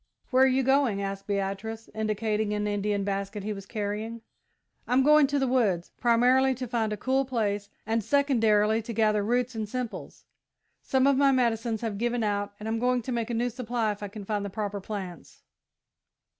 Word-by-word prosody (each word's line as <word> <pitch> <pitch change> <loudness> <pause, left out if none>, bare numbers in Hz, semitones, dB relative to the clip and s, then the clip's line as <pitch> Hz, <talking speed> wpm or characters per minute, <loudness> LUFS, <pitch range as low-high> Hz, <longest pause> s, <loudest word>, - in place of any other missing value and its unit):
"Where 260 0 +6
are - - +5
you 265 0 +2
going?" 265 -6 +2
asked 195 0 -4
Beatrice, 200 +3 -3
indicating 215 0 -1
an 210 0 -1
Indian 205 0 -1
basket 200 +1 -3
he 215 +1 -2
was 195 -1 -9
carrying. 215 +2 -4 0.7
"I'm 255 +2 +3
going 300 0 +6
to 285 +1 0
the 270 - +1
woods 210 -9 +1
primarily, 255 +2 +4
to 255 +1 -5
find 220 -2 -1
a 210 - -2
cool 265 +5 +1
place, 205 -6 -2 0.2
and, 225 +1 0
secondarily, 225 -6 +3
to 230 +1 -6
gather 215 -2 +2
roots 245 +3 0
and 220 -2 -4
simples. 250 -1 -6 0.6
Some 265 0 +1
of 280 -1 +4
my 275 0 +5
medicines 230 -3 0
have 220 -4 -3
given 240 0 0
out 205 -1 -1
and 210 - -6
I'm 225 0 -1
going 250 0 +1
to 255 - -4
make 235 -2 -2
a 235 - -1
new 240 +2 0
supply 235 -2 -1
if 205 - -8
I 205 - -3
can 205 0 -9
find 205 0 -2
the 200 - -4
proper 205 0 -4
plants." 190 -5 -7
220 Hz, 195 wpm, -27 LUFS, 205-250 Hz, 0.7 s, Where